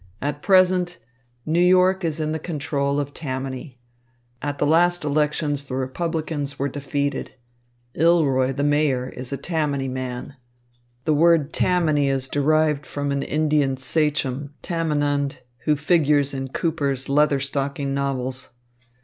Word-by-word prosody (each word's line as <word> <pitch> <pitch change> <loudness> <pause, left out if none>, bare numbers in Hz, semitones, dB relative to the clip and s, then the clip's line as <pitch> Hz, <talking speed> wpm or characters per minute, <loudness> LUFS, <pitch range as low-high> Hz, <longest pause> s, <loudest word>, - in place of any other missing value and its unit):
"At 145 +1 -3
present 185 -2 +3 0.5
New 160 +2 +1
York 185 +1 +4
is 160 -1 -1
in 155 0 -1
the 160 - -2
control 145 -3 -1
of 145 0 -4
Tammany. 130 -2 -5 0.6
At 145 0 -3
the - - +1
last 175 +3 +3
elections 150 -1 0
the 130 - -4
Republicans 145 +1 -3
were 140 +1 -1
defeated. 140 +1 -3 0.6
Ilroy, 145 -6 +3
the 140 +2 -2
Mayor, 145 -3 +1
is 125 0 -8
a 140 - -2
Tammany 150 -5 -1
man. 130 +1 -5 0.7
The 155 - +3
word 160 -1 +3
Tammany 155 -6 +2
is 135 -1 -1
derived 150 0 +1
from 145 0 -3
an 140 0 0
Indian 150 -3 +1
sachem, 145 0 0
Tamenund, 145 -4 0 0.3
who 150 - +3
figures 150 -2 +2
in 135 0 -3
Cooper's 140 -2 -1
Leather 145 0 +3
stocking 140 0 -2
novels. 130 -2 -2
145 Hz, 130 wpm, -23 LUFS, 135-155 Hz, 0.7 s, York